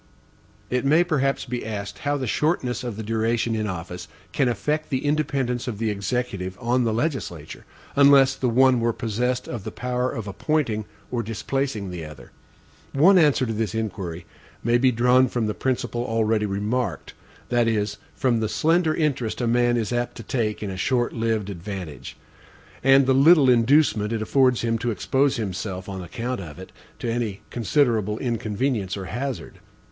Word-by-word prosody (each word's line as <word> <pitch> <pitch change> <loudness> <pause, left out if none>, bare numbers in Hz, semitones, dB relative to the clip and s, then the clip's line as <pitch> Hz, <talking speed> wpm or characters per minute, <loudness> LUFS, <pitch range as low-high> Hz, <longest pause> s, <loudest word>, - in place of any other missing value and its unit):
It 125 0 +1
may 155 +5 +4
perhaps 140 -5 0
be 125 -1 -4
asked, 100 -2 -5
how 145 0 0
the 135 - -3
shortness 130 -1 0
of 120 -4 -5
the 110 - -4
duration 115 +1 0
in 110 -1 -1
office 90 -1 -6 0.2
can 135 -4 +1
affect 150 +6 -1
the 130 0 -2
independence 135 -5 0
of 115 -4 -3
the 110 0 0
Executive 100 -2 -3
on 120 +1 +1
the 115 - +1
legislature, 110 - -3 0.3
unless 140 -1 +6
the 130 -2 -1
one 130 +1 +4
were 115 0 +1
possessed 125 +2 -2
of 120 -5 -5
the 110 - -4
power 125 +1 -2
of 110 -4 -5
appointing 110 -1 -1 0.3
or 120 -1 0
displacing 115 -2 -3
the 85 -2 -6
other. 75 -1 -11 0.6
One 180 +7 +6
answer 145 -5 +4
to 115 - -2
this 110 -2 -2
inquiry 90 -6 -4 0.4
may 120 +1 +3
be 130 0 +4
drawn 125 +2 +4
from 120 -2 -1
the 105 - -1
principle 120 0 -2
already 110 -2 +1
remarked 105 0 -2 0.4
that 120 -1 +2
is, 105 -2 0 0.2
from 125 -4 +1
the 110 -1 -1
slender 160 +4 +2
interest 135 -8 -1
a 120 - 0
man 120 +1 +2
is 115 0 -1
apt 120 0 -2
to 115 - -7
take 110 -2 -2
in 100 - -3
a 95 - -6
short 120 +3 0
lived 110 -3 -1
advantage, 85 - -7 0.7
and 135 +1 +6
the 130 - +3
little 140 0 +6
inducement 115 -3 +3
it 115 -1 -1
affords 130 +1 +3
him 115 -1 0
to 120 - -1
expose 135 +5 +1
himself, 95 -3 -4
on 95 -1 -5
account 120 +6 -4
of 75 -5 -9
it, - - -10 0.3
to - - -5
any 115 -4 -2
considerable 115 -4 +1
inconvenience 115 -3 -2
or 95 - -5
hazard. 125 +7 -5
120 Hz, 175 wpm, -24 LUFS, 105-130 Hz, 0.7 s, unless